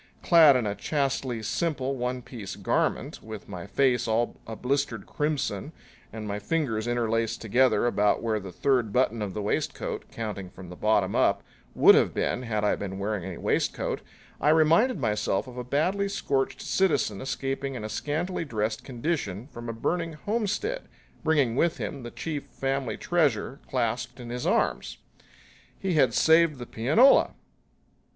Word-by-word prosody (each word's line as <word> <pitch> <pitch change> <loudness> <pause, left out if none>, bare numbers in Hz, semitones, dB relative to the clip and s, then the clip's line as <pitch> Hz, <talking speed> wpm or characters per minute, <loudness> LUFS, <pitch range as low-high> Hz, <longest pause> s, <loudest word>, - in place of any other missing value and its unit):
Clad 160 -5 +7
in 125 -3 +1
a 100 - -1
chastely 135 -3 -1
simple 135 +3 -1
one 125 0 -3
piece 110 -6 -7
garment, - - -1
with 110 -2 -9
my 90 -1 -7
face 125 +1 +2
all 115 +2 +1
a 110 - -5
blistered 125 -4 -1
crimson 150 +1 -2 0.4
and 110 -1 -6
my 100 0 -3
fingers 115 -3 -1
interlaced 115 -1 0
together 120 0 +3
about 105 -3 +2
where 110 -2 0
the 95 -2 -8
third 120 +2 +1
button 115 -1 +1
of 100 -3 -4
the 105 - -3
waistcoat, 105 - -2
counting 105 -5 -5
from 90 -1 -11
the 90 - -8
bottom 100 -1 +1
up, - - +2 0.3
would - - +8
have - - +3
been - - 0
had 110 -4 -2
I 105 - +3
been 95 -1 -5
wearing 100 -1 -2
any 90 -2 -6
waistcoat, - - -1 0.4
I 150 - +3
reminded 165 +10 +4
myself 105 -4 0
of 125 -2 -11
a 125 - -4
badly 180 +10 0
scorched 135 -8 -1
citizen 155 - +1
escaping 135 0 -3
in 120 - -5
a - - -3
scantily 155 - -2
dressed 110 -5 -2
condition 120 - -3
from 120 -1 -7
a - - 0
burning 165 +9 -2
homestead 225 - -2 0.4
bringing 145 -7 +2
with 170 +4 +2
him 140 - -5
the 120 - -7
chief 150 +2 -5
family 135 -4 -2
treasure 145 -6 0
clasped 120 0 -2
in 120 -1 -7
his 125 0 -3
arms. - - 0 0.8
He 190 -2 -1
had 135 -7 +3
saved 160 -2 +5
the 120 - -7
pianola! 150 - +4
125 Hz, 160 wpm, -27 LUFS, 110-150 Hz, 0.8 s, would